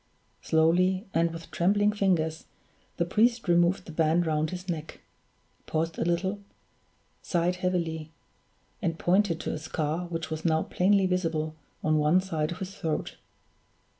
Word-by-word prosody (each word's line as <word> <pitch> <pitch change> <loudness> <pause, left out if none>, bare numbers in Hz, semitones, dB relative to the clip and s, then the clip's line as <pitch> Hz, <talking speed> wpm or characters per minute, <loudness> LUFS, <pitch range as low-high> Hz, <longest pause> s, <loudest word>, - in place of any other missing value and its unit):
Slowly 180 +5 +2
and 165 +1 +3
with 165 0 -9
trembling 205 +4 +3
fingers 170 -6 0 0.5
the 170 - +1
priest 225 +5 +2
removed 175 +1 +3
the - - -8
band 165 +2 +2
round 155 -1 0
his 180 +2 -7
neck 160 -3 -5 0.7
paused 165 +1 -1
a - - +1
little 185 +4 0 0.8
sighed 175 +1 0
heavily 170 -4 -2 0.7
and 165 -5 -1
pointed 180 -1 +2
to - - -3
a - - -4
scar 155 +2 -2
which 165 -2 -5
was 160 0 -4
now 160 -1 +2
plainly 195 +1 +2
visible 165 -4 -1 0.3
on 155 0 +3
one 150 +5 +4
side 160 -5 -2
of 175 - -5
his 190 0 -6
throat. 160 -2 -3
170 Hz, 145 wpm, -28 LUFS, 160-185 Hz, 0.8 s, one